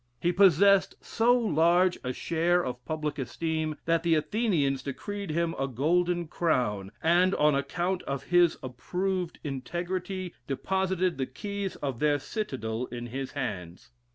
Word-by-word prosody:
He 175 - +2
possesed 195 +1 +5
so 240 +2 +2
large 175 -3 +3
a 125 - -2
share 170 +5 +1
of 125 -1 -5
public 155 -2 -3
esteem 155 +4 -2
that 165 0 +2
the 165 -1 +3
Athenians 155 - +1
decreed 200 +8 -5
him 165 +1 0
a 135 - 0
golden 170 +6 +1
crown, 120 - 0
and 175 +3 +4
on 150 0 +4
account 175 +7 -1
of 140 -1 -4
his 175 -1 +3
approved 180 +8 -3
integrity, 175 +6 -4
deposited 185 +2 0
the 130 - -1
keys 200 +7 -5
of 135 -5 -4
their 150 -1 +3
citadel 130 - -4
in 120 0 -6
his 130 +3 -5
hands. 95 - -5
165 Hz, 140 wpm, -28 LUFS, 135-185 Hz, -, possesed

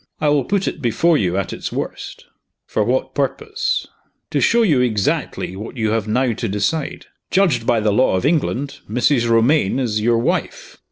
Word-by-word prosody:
I 150 - +2
will 145 -3 +2
put 200 -1 0
it - - -4
before 150 +8 +2
you 95 -8 0
at 100 - -2
its - - -5
worst." - - -6 0.4
"For 110 - 0
what 130 +3 -1
purpose?" 420 - -1 0.5
"To - - +1
show 235 0 +4
you 150 - +3
exactly 105 -5 -1
what 110 +6 -8
you 110 -2 0
have 110 -1 -1
now 125 +2 +1
to 115 0 -4
decide. 135 +10 -2 0.2
Judged 160 -12 +2
by 115 - +3
the 105 -1 +1
law 125 -2 +3
of 95 - -1
England, 145 -3 0
Mrs. 120 +1 +2
Romayne 115 +1 +3
is 110 -5 -1
your 115 +1 +2
wife. 115 - -2
125 Hz, 180 wpm, -19 LUFS, 110-150 Hz, 0.5 s, show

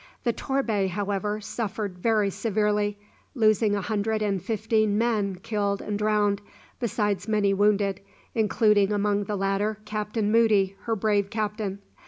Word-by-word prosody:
The 235 - +1
"Torbay," 225 -9 0
however, 205 +2 -2
suffered 205 -3 -4
very 210 -1 +2
severely, 210 -1 0 0.4
losing 215 -2 +3
a 200 - -1
hundred 215 +1 -1
and 200 -3 0
fifteen 215 -2 +1
men 215 -4 +1
killed 200 +1 -2
and 205 -1 -3
drowned, 210 -1 +1 0.4
besides 210 -4 -1
many 210 -2 +2
wounded, 200 -1 +2 0.3
including 210 -2 +3
among 205 0 +1
the 210 - -2
latter 195 +2 0
Captain 210 0 -2
Moody, 210 -4 +3
her 230 -1 0
brave 205 -1 +1
captain. 210 -2 -3
210 Hz, 135 wpm, -26 LUFS, 200-215 Hz, 0.4 s, losing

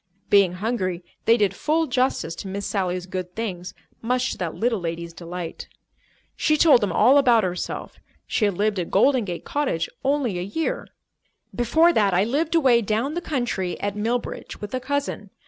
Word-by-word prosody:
Being 195 -3 +5
hungry, 185 -3 -2 0.2
they 230 +1 +5
did 205 -4 +2
full 315 +2 +1
justice 255 - 0
to - - -6
Miss 200 +1 -4
Sally's 185 -3 -1
good 185 -1 -6
things, 185 -6 -5 0.3
much 250 +2 0
to - - -5
that 170 -3 -3
little 230 -2 0
lady's 170 0 -5
delight. 170 0 -7 0.7
She 305 -1 +2
told 295 -6 +6
them 205 - 0
all 275 +3 +5
about 240 -5 +4
herself. 180 -1 -4 0.3
She 215 - +1
had 200 -4 0
lived 210 -1 +1
at 175 - -3
Golden 250 +3 +3
Gate 175 -3 -5
Cottage 275 - -1 0.2
only 265 -9 0
a - - -3
year. 325 - -3 0.7
"Before 320 +9 +3
that, 200 - +2
I 185 - +4
lived 300 +9 0
away 260 -7 +5
down 225 +7 -1
the 345 - -2
country 240 - -2
at 205 0 -2
Millbridge 230 +3 -3
with 210 +2 -7
a 255 - 0
cousin. 270 -6 -3
215 Hz, 180 wpm, -23 LUFS, 185-260 Hz, 0.7 s, told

